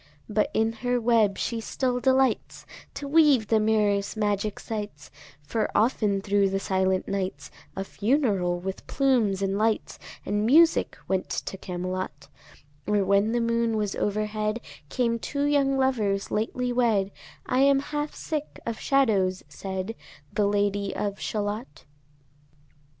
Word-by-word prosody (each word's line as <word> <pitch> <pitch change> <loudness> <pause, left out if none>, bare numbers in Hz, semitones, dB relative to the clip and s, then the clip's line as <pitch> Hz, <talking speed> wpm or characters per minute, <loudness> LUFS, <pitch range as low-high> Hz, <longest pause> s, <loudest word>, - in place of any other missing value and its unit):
But 210 0 +1
in 220 +1 +2
her 245 0 +1
web 225 -4 +3
she 230 -1 -2
still 250 +2 -1
delights 265 0 +1 0.3
To 285 - -5
weave 285 -7 +4
the 220 - +4
mirror's 210 -1 +1
magic 205 -1 -1
sights, 205 -10 -6 0.3
For 220 +9 -1
often 210 -3 +2
thro' 200 -1 +2
the 195 0 -1
silent 190 -1 0
nights 195 -1 -3 0.2
A 195 - -2
funeral, 200 -6 0
with 190 +1 -6
plumes 230 -8 +2
and 195 +1 0
lights 220 0 0 0.3
And 205 +1 0
music, 320 +9 +4
went 190 -1 -1
to - - -4
Camelot: 185 -5 -5 0.6
Or 210 -1 +2
when 200 +3 +3
the 240 - +1
moon 230 -1 +1
was 210 -2 -1
overhead, 215 +1 -1 0.3
Came 235 -2 0
two 280 +4 -2
young 280 -2 +2
lovers 215 -7 0
lately 245 +3 -1
wed; 220 -6 +2 0.3
"I 255 - 0
am 275 0 +5
half 295 +1 -4
sick 300 -2 -4
of 230 -1 -3
shadows," 205 -9 +2
said 190 +2 -5 0.4
The 210 -2 +2
Lady 205 -1 0
of 205 -1 -3
Shalott. 205 - -4
215 Hz, 140 wpm, -26 LUFS, 195-245 Hz, 0.6 s, am